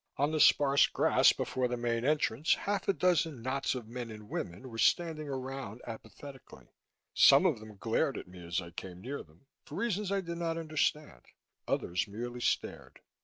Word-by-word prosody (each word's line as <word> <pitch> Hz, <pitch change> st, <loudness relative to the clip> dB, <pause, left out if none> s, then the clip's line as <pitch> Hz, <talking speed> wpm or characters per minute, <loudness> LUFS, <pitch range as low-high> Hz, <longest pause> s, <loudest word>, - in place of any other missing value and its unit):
On 145 Hz, +2 st, +1 dB
the 155 Hz, -, 0 dB
sparse 140 Hz, -1 st, +5 dB
grass -, -, +4 dB
before 130 Hz, -1 st, -1 dB
the 125 Hz, 0 st, -3 dB
main 120 Hz, -1 st, -1 dB
entrance, 150 Hz, -1 st, +2 dB
half 205 Hz, 0 st, -2 dB
a 195 Hz, -, +4 dB
dozen 165 Hz, -7 st, +1 dB
knots 135 Hz, +1 st, -1 dB
of 120 Hz, -4 st, -6 dB
men 120 Hz, 0 st, -6 dB
and 105 Hz, -1 st, -10 dB
women 90 Hz, +10 st, -5 dB
were 115 Hz, -2 st, -8 dB
standing 155 Hz, +5 st, +1 dB
around 130 Hz, -4 st, -5 dB
apathetically. 120 Hz, +4 st, -11 dB, 0.4 s
Some -, -, +7 dB
of -, -, +2 dB
them 110 Hz, -1 st, -12 dB
glared 120 Hz, +7 st, 0 dB
at -, -, -7 dB
me 90 Hz, -1 st, -12 dB
as 85 Hz, +2 st, -2 dB
I 85 Hz, -1 st, -10 dB
came 90 Hz, +1 st, -8 dB
near 135 Hz, +8 st, -5 dB
them, 80 Hz, -, -20 dB, 0.2 s
for 150 Hz, -, -10 dB
reasons 210 Hz, -4 st, -1 dB
I 200 Hz, 0 st, +1 dB
did 170 Hz, -1 st, -6 dB
not 165 Hz, -1 st, -1 dB
understand; 155 Hz, -, -1 dB, 0.5 s
others 90 Hz, +6 st, -1 dB
merely 120 Hz, +4 st, -6 dB
stared. -, -, -2 dB
130 Hz, 180 wpm, -31 LUFS, 110-155 Hz, 0.5 s, Some